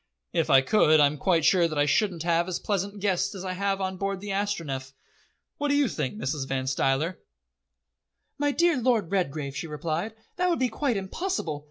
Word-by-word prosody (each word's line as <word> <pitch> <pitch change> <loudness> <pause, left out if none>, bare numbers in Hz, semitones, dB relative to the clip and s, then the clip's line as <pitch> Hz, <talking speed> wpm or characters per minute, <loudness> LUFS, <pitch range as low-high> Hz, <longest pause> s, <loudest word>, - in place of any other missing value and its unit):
"If - - +1
I 135 - +7
could, 155 +1 +4
I'm 145 0 +3
quite 170 -5 +2
sure 175 -3 +5
that 155 -2 -5
I 145 - +3
shouldn't 170 +2 +1
have 170 0 +2
as 185 - -2
pleasant 200 0 -2
guests 200 +1 0
as 190 0 -6
I 185 - -2
have 195 +1 0
now 190 - -1
on 185 0 -4
board 195 0 -2
the 200 +1 -6
Astronef. 165 -10 -3 0.7
What 290 - 0
do 285 - +2
you 285 -2 +3
think, 150 - -3
Mrs. 140 -7 -3
Van 130 -1 -2
Stuyler?" 135 +6 0 1.2
"My 290 0 +2
dear 330 -2 +2
Lord 225 -8 +1
Redgrave," 150 -7 -1
she 145 +4 -4
replied, 165 +7 -3 0.2
"that 360 0 +2
would 340 - +1
be 255 -1 +1
quite 240 0 -1
impossible. 190 - -3
185 Hz, 200 wpm, -27 LUFS, 150-210 Hz, 1.2 s, I